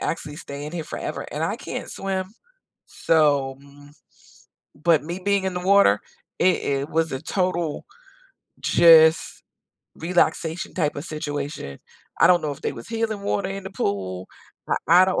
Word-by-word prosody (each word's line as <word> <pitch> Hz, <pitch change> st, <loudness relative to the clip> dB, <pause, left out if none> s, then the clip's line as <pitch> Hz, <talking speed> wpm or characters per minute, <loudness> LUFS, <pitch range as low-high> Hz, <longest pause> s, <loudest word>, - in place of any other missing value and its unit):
actually 150 Hz, -3 st, -3 dB
stay 140 Hz, -2 st, -7 dB
in 150 Hz, -, -7 dB
here 170 Hz, -2 st, -3 dB
forever." -, -, -5 dB
And -, -, -2 dB
I -, -, -1 dB
can't -, -, -6 dB
swim, 190 Hz, -1 st, -3 dB, 0.6 s
so, 145 Hz, -4 st, +2 dB
m 145 Hz, 0 st, -17 dB, 0.9 s
but 160 Hz, +1 st, +2 dB
me 175 Hz, +4 st, -5 dB
being 200 Hz, 0 st, +1 dB
in 190 Hz, -, -1 dB
the -, -, -1 dB
water, 200 Hz, -, +5 dB, 0.4 s
it 180 Hz, 0 st, +4 dB
it 140 Hz, +1 st, -1 dB
was 165 Hz, -1 st, 0 dB
a 130 Hz, -, -4 dB
total 175 Hz, -5 st, -1 dB, 0.8 s
just 160 Hz, -1 st, +6 dB, 0.6 s
relaxation 165 Hz, 0 st, 0 dB
type 150 Hz, -5 st, 0 dB
of 145 Hz, -, -5 dB
situation. 145 Hz, -, -5 dB, 0.4 s
I -, -, +8 dB
don't 180 Hz, -1 st, +5 dB
know 150 Hz, -, -2 dB
if 140 Hz, -, -12 dB
there -, -, -2 dB
was 115 Hz, -, -10 dB
healing 225 Hz, -2 st, -2 dB
water 200 Hz, 0 st, -1 dB
in 195 Hz, 0 st, -6 dB
the -, -, -5 dB
pool, 95 Hz, -, -3 dB, 0.4 s
I -, -, +1 dB, 0.3 s
I -, -, +7 dB
don't 190 Hz, -, 0 dB
160 Hz, 160 wpm, -23 LUFS, 145-185 Hz, 0.9 s, I